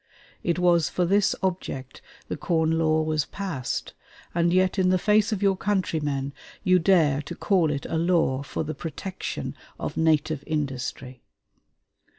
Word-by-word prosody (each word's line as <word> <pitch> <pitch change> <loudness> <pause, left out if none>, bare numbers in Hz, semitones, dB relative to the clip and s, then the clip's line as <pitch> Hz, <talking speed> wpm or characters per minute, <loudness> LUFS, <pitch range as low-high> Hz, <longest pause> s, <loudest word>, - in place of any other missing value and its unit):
It 170 -1 0
was 175 -2 +3
for 180 - 0
this 200 +3 +3
object 155 -8 -3 0.3
the - - -3
Corn 160 -2 +1
Law 155 -1 +2
was 155 -2 0
passed, 185 -11 -4 0.4
and 170 0 +2
yet 185 +2 +2
in 185 -1 +3
the 185 - +4
face 215 +3 +3
of 205 -2 -1
your 195 -1 +4
countrymen 155 -9 -1 0.3
you 185 -2 +4
dare 160 -6 +3
to 170 +4 -7
call 180 -5 +2
it 140 -1 -3
a 160 - -1
law 165 -6 +2
for 140 - -4
the 155 0 -4
protection 175 +5 -5 0.2
of - - -4
native 155 -2 +2
industry.... 135 -4 -3
165 Hz, 155 wpm, -25 LUFS, 150-185 Hz, 0.4 s, the